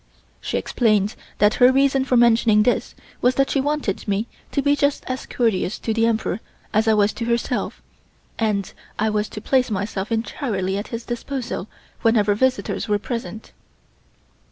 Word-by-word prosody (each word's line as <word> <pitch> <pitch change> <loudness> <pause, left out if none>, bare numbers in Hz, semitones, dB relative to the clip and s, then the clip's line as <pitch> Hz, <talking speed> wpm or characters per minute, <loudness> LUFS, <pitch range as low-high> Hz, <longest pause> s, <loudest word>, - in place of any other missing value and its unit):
She - - -2
explained 215 -3 +1 0.2
that 210 +1 +4
her 250 +1 +8
reason 270 0 +3
for 255 -2 +2
mentioning 225 -2 +5
this 245 - 0 0.3
was 250 +1 +3
that 275 +1 +2
she 275 - +2
wanted 290 -10 -2
me 205 +2 0 0.3
to 280 - 0
be 285 0 +4
just 285 0 +1
as 255 0 -4
courteous 220 -5 0
to 225 - -2
the 225 +1 +2
Emperor 220 -3 -1 0.3
as 220 +1 +2
I 220 - +5
was 205 0 +3
to 230 - -4
herself, 235 0 -2 0.6
and 210 -3 0 0.2
I 220 0 +1
was 210 0 -1
to - - -7
place 255 +2 +2
myself 200 0 -3
entirely 220 -4 -2
at 205 +2 -3
his 230 -1 -6
disposal 240 -3 -4 0.3
whenever 215 -3 +3
visitors 260 +2 0
were 205 - +3
present. 230 0 -6
225 Hz, 165 wpm, -22 LUFS, 210-255 Hz, 0.6 s, her